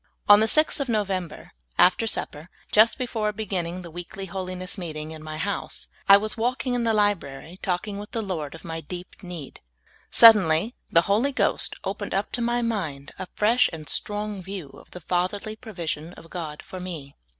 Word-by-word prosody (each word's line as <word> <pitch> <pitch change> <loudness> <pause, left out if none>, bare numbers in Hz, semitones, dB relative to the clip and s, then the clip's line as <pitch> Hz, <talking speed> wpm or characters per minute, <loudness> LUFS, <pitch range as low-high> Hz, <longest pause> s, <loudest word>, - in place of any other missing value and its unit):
On 205 0 +9
the 220 - +3
6th 310 +6 +3
of 280 - -1
Xovember, 195 -7 -2 0.3
after 205 +5 +5
sup - - -1
per, 150 +5 -12 0.2
just 220 +2 +6
before 225 -5 -1
beginning 185 -4 -3
the 170 - -9
weekly 175 +3 -7
holiness 185 0 -4
meeting 155 -5 -5
in 160 -1 -8
m}^ 155 0 -6
house, 200 +4 -3 0.2
I 200 - +11
was 215 +3 -3
walking 245 +2 -1
in 240 -1 0
the 225 - +3
library, 180 -5 0
talking 200 +3 -2
with 210 - -8
the 225 - -3
Lord 165 -7 -4
of 165 - -12
m}^ 165 -2 -6
deep 180 +2 -8
need; 175 -7 -8 0.5
suddenly 210 -2 +7 0.2
the 165 - +6
Hoh' 220 +9 +2
Ghost - - +1
opened - - -3
up - - -1
to 245 - -2
my 240 +1 +1
mind 160 -12 -2
a 185 - -4
fresh 225 +4 +4
and 155 -2 -8
strong 210 +4 -2
view 185 -5 -6
of - - -16
the 180 - -9
Fatherly 185 +6 -1
provision 170 -7 -5
of 165 - -14
God 155 -4 -5
for 185 - -8
me. 165 -6 -7
185 Hz, 185 wpm, -25 LUFS, 165-215 Hz, 0.5 s, I